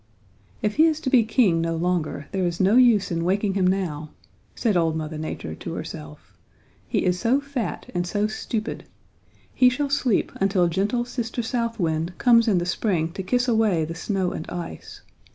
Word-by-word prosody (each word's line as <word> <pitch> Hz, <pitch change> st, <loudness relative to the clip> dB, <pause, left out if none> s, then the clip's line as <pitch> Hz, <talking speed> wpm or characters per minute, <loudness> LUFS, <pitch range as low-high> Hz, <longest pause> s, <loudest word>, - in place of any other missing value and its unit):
'If 210 Hz, +3 st, -1 dB
he 320 Hz, +1 st, +6 dB
is 315 Hz, -1 st, 0 dB
to 260 Hz, -, -2 dB
be 255 Hz, -, +6 dB
king 220 Hz, -7 st, +2 dB
no 165 Hz, 0 st, -1 dB
longer, 165 Hz, -3 st, -1 dB
there 190 Hz, -2 st, -1 dB
is 170 Hz, 0 st, -4 dB
no 195 Hz, +4 st, +4 dB
use 235 Hz, -7 st, +5 dB
in 165 Hz, -1 st, -1 dB
waking 195 Hz, +3 st, +1 dB
him 190 Hz, -2 st, +2 dB
now,' 165 Hz, -6 st, -1 dB, 0.5 s
said 220 Hz, -4 st, 0 dB
old 165 Hz, -2 st, +2 dB
Mother 155 Hz, -1 st, -4 dB
Nature 120 Hz, -, -5 dB
to -, -, -7 dB
herself, 75 Hz, 0 st, -9 dB, 0.5 s
'he -, -, 0 dB
is 180 Hz, 0 st, +1 dB
so 245 Hz, +6 st, +2 dB
fat 280 Hz, -5 st, -4 dB
and 175 Hz, 0 st, -1 dB
so 205 Hz, +3 st, 0 dB
stupid. 220 Hz, +1 st, -4 dB, 0.7 s
He 250 Hz, -, +5 dB
shall 275 Hz, +3 st, -2 dB
sleep 255 Hz, -6 st, +1 dB
until 195 Hz, -2 st, +2 dB
gentle 205 Hz, +7 st, 0 dB
Sister 240 Hz, -1 st, -4 dB
South 230 Hz, -1 st, -2 dB
Wind 165 Hz, 0 st, -1 dB
comes 235 Hz, -1 st, +5 dB
in 205 Hz, -4 st, +3 dB
the 175 Hz, -, 0 dB
spring 175 Hz, -3 st, 0 dB
to 190 Hz, -, -5 dB
kiss 245 Hz, +7 st, 0 dB
away 220 Hz, -9 st, +2 dB
the 165 Hz, -, -5 dB
snow 185 Hz, +1 st, -2 dB
and 155 Hz, -, -6 dB
ice. 175 Hz, -1 st, -7 dB
195 Hz, 190 wpm, -24 LUFS, 170-230 Hz, 0.7 s, he